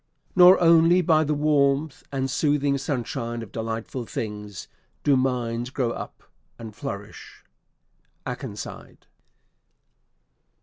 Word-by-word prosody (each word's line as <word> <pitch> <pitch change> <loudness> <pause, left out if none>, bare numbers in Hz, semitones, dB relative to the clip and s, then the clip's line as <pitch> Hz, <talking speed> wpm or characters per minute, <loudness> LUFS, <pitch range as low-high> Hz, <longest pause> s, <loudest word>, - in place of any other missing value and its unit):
"Nor 180 +1 +8
only 170 +1 +5
by 155 -1 +4
the 150 0 -1
warmth 145 -1 +1
And 135 -1 -1
soothing 145 0 +1
sunshine 120 -3 -3
of 105 - -12
delightful 115 +2 -5
things, 105 -2 -6 0.4
Do 145 - +4
minds 125 -2 -1
grow 130 -3 -1
up - - -8 0.3
and 110 -2 -9
flourish." 100 -7 -8 0.8
AKENSIDE. - - -7
135 Hz, 100 wpm, -24 LUFS, 115-150 Hz, 0.8 s, Nor